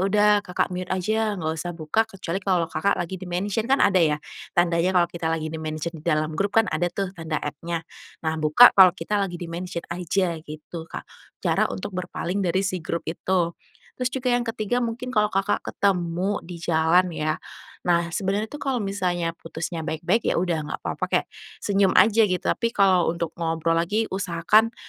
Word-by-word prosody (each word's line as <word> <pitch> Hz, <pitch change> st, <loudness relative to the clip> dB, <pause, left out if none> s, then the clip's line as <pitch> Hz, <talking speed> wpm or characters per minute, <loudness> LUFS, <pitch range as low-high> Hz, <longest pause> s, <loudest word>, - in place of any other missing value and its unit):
udah 210 Hz, +2 st, +3 dB
Kakak 180 Hz, 0 st, -1 dB
mute 180 Hz, 0 st, -4 dB
aja 215 Hz, +3 st, 0 dB
nggak 160 Hz, -1 st, -2 dB
usah 175 Hz, +2 st, -4 dB
buka 160 Hz, +7 st, +1 dB
kecuali 190 Hz, -2 st, -4 dB
kalau 180 Hz, -3 st, +2 dB
Kakak 165 Hz, +5 st, 0 dB
lagi 175 Hz, +1 st, -3 dB
di-mention 195 Hz, +5 st, -2 dB
kan 270 Hz, -, +5 dB
ada 190 Hz, -2 st, +4 dB
ya 150 Hz, -3 st, +3 dB, 0.4 s
tandanya 175 Hz, +1 st, +3 dB
kalau 175 Hz, -1 st, +5 dB
kita 170 Hz, -1 st, -4 dB
lagi 160 Hz, -1 st, -1 dB
di-mention 155 Hz, +1 st, -4 dB
di -, -, -17 dB
dalam 155 Hz, -1 st, 0 dB
grup 200 Hz, +5 st, -1 dB
kan 225 Hz, -, +4 dB
ada 175 Hz, +3 st, +1 dB
tuh 195 Hz, +1 st, -3 dB
tanda 160 Hz, -3 st, -3 dB
@-nya 165 Hz, +3 st, -4 dB, 0.4 s
nah 160 Hz, 0 st, 0 dB
buka 155 Hz, +11 st, +8 dB
kalau 190 Hz, -2 st, +9 dB
kita 205 Hz, +5 st, -1 dB
lagi 175 Hz, -3 st, -3 dB
di-mention 170 Hz, 0 st, -5 dB
aja 175 Hz, -1 st, -1 dB
gitu 155 Hz, +2 st, -9 dB
Kak -, -, -7 dB, 0.4 s
cara -, -, +2 dB
untuk 95 Hz, -, -5 dB
berpaling 180 Hz, +1 st, -3 dB
dari 185 Hz, +1 st, +1 dB
si 185 Hz, -2 st, -2 dB
grup 170 Hz, +1 st, -3 dB
itu. 175 Hz, +1 st, 0 dB, 0.4 s
Terus 250 Hz, -1 st, -1 dB
juga 250 Hz, -1 st, -1 dB
yang 245 Hz, -, +2 dB
ke-3 230 Hz, +1 st, -1 dB
mungkin 235 Hz, +2 st, -3 dB
kalau 210 Hz, 0 st, +3 dB
Kakak 195 Hz, +2 st, 0 dB
ketemu 185 Hz, 0 st, 0 dB
di 170 Hz, 0 st, -9 dB
jalan 165 Hz, +2 st, +2 dB
ya, 155 Hz, 0 st, -1 dB, 0.5 s
nah 170 Hz, -1 st, +2 dB
sebenarnya 195 Hz, +5 st, -1 dB
itu 295 Hz, -, -7 dB
kalau 265 Hz, -5 st, -1 dB
misalnya 180 Hz, -4 st, -1 dB
putusnya 165 Hz, 0 st, -5 dB
baik-baik 165 Hz, +8 st, 0 dB
ya -, -, +2 dB
udah 165 Hz, -3 st, 0 dB
nggak -, -, -5 dB
papa -, -, -2 dB
kayak -, -, 0 dB, 0.3 s
senyum 195 Hz, -2 st, +2 dB
aja 225 Hz, 0 st, +6 dB
gitu, 185 Hz, -2 st, -1 dB
tapi 230 Hz, 0 st, 0 dB
kalau 190 Hz, -3 st, +4 dB
untuk 170 Hz, -1 st, -3 dB
ngobrol 165 Hz, 0 st, 0 dB
lagi 210 Hz, +6 st, 0 dB
usahakan 190 Hz, +5 st, +2 dB
180 Hz, 185 wpm, -24 LUFS, 165-200 Hz, 0.5 s, kalau